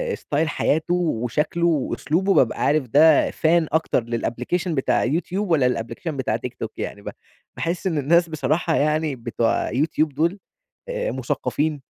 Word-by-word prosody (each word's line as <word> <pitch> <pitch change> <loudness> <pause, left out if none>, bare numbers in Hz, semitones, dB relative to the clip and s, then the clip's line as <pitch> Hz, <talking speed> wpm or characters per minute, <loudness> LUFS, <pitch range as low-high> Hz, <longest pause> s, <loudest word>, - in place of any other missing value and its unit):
ستايل 155 +2 -1
حياته 160 +3 0
وشكله 155 0 0
وأسلوبه 165 +4 0
بابقى 125 - +2
عارف 145 -3 +2
ده 150 +4 +5
فان 165 0 +2
أكتر 160 -5 +1
للأبليكيشن 125 +9 -2
بتاع 135 - +1
يوتيوب 180 +6 -1
والّا 140 -6 +4
للأبليكيشن 125 +6 -4
بتاع 120 -5 -1
تيك 120 +1 -5
توك 110 - -5
يعني، 100 - -5
ب - - -6 0.5
باحس 170 +3 -2
إن 165 - -1
الناس 170 +4 +3
بصراحة 160 +1 0
يعني 155 0 +1
بتوع 115 -1 -1
يوتيوب 150 +2 0
دول 170 +7 0 0.5
آآ، - - -2
مثقفين، 150 -1 -2
155 Hz, 145 wpm, -22 LUFS, 130-170 Hz, 0.5 s, ده